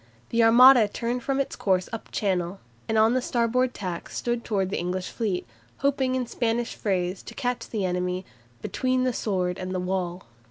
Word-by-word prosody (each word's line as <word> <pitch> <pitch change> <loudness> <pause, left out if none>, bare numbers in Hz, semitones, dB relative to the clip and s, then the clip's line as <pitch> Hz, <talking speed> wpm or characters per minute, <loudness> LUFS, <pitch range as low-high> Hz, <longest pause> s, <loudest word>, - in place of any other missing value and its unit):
The 230 0 +3
Armada 240 0 +8
turned 235 +4 -3
from 275 +2 -1
its 275 - -1
course 185 -2 +1
up 225 - -6
Channel, 185 -2 -1 0.3
and 220 - +1
on 220 +2 +5
the 255 - +1
starboard 245 +1 +1
tack 180 -4 -5
stood 240 -1 -2
towards 195 -4 -1
the - - -1
English 180 +1 -3
fleet, 200 - -2 0.3
hoping 265 -2 +1
in 255 -1 0
Spanish 235 0 -1
phrase 185 -2 -1
to - - -11
catch 245 -2 -2
the 210 -4 -1
enemy 180 +1 -1 0.4
"between 255 0 0
the 255 -1 +1
sword 185 -5 -1
and 185 0 -4
the - - 0
wall." 180 -1 -2
220 Hz, 185 wpm, -26 LUFS, 185-245 Hz, 0.4 s, Armada